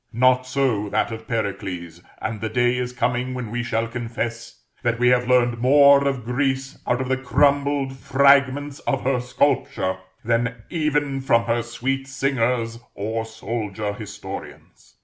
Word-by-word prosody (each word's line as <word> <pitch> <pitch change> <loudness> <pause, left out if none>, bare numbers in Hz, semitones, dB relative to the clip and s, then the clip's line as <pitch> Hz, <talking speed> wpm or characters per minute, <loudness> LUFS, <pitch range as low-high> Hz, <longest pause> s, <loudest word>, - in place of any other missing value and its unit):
Not 130 +2 +3
so 125 -6 0
that 115 - 0
of 110 0 -7
Pericles: 95 -6 -4 0.2
and 110 -2 -4
the 110 - -2
day 120 +2 +2
is 125 0 -2
coming 125 +1 -1
when 120 -4 -5
we 120 0 -1
shall 115 -1 -1
confess, 115 0 -5 0.2
that 120 -1 0
we 125 +1 +4
have 125 -1 +3
learned 120 -2 +3
more 140 +2 +6
of 130 -4 -2
Greece 135 +2 -1
out 125 +1 +1
of 130 - -3
the 130 0 +1
crumbled 140 +1 +1
fragments 140 +1 +3
of 135 - 0
her 130 -1 +1
sculpture 125 -7 0 0.3
than 115 0 0
even 150 -4 0
from 125 -3 +3
her 115 0 0
sweet 135 +3 -3
singers 125 -4 0 0.2
or 110 +2 -2
soldier 110 -2 -4
historians. 100 -1 -9
125 Hz, 150 wpm, -23 LUFS, 115-135 Hz, 0.3 s, more